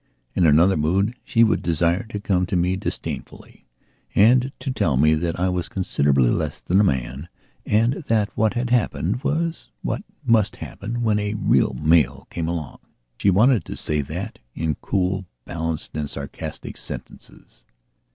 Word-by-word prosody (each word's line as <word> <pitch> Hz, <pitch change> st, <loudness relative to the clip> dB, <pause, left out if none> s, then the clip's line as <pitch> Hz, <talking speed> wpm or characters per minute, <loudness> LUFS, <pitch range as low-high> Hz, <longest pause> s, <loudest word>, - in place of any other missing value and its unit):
In 85 Hz, -, +3 dB
another 80 Hz, +5 st, +5 dB
mood 95 Hz, +9 st, +1 dB
she 115 Hz, -, +3 dB
would 110 Hz, -4 st, +2 dB
desire 85 Hz, +4 st, +1 dB
to 105 Hz, -3 st, -5 dB
come 90 Hz, -3 st, +1 dB
to 90 Hz, -, -2 dB
me 90 Hz, +1 st, +2 dB
disdainfully 95 Hz, -, -6 dB, 0.5 s
and 125 Hz, +5 st, +5 dB
to 135 Hz, -, -4 dB
tell 80 Hz, -, +1 dB
me 75 Hz, +3 st, +5 dB
that 85 Hz, +2 st, -1 dB
I 90 Hz, -, +2 dB
was 90 Hz, -1 st, -2 dB
considerably 70 Hz, -9 st, +2 dB
less -, -, -2 dB
than 95 Hz, +3 st, +2 dB
a -, -, +5 dB
man 65 Hz, 0 st, -1 dB, 0.4 s
and 115 Hz, +8 st, +2 dB
that 110 Hz, -2 st, +1 dB
what 110 Hz, +2 st, +1 dB
had 120 Hz, 0 st, -1 dB
happened 120 Hz, -1 st, 0 dB
was 165 Hz, +2 st, -1 dB
what -, -, -2 dB, 0.2 s
must 110 Hz, -5 st, +3 dB
happen 120 Hz, +4 st, -5 dB
when 105 Hz, -2 st, +2 dB
a 105 Hz, +1 st, -2 dB
real -, -, +2 dB
male 75 Hz, -4 st, +2 dB
came 80 Hz, -2 st, -3 dB
along. 85 Hz, -3 st, -4 dB, 0.4 s
She 100 Hz, -, +3 dB
wanted 110 Hz, +2 st, +4 dB
to -, -, -6 dB
say 75 Hz, -1 st, 0 dB
that 90 Hz, +9 st, -6 dB, 0.2 s
in 80 Hz, -1 st, 0 dB
cool, 95 Hz, 0 st, -1 dB, 0.2 s
balanced 80 Hz, -3 st, -4 dB
and 75 Hz, -2 st, -2 dB
sarcastic -, -, -7 dB
sentences. -, -, -10 dB
95 Hz, 160 wpm, -23 LUFS, 80-110 Hz, 0.5 s, another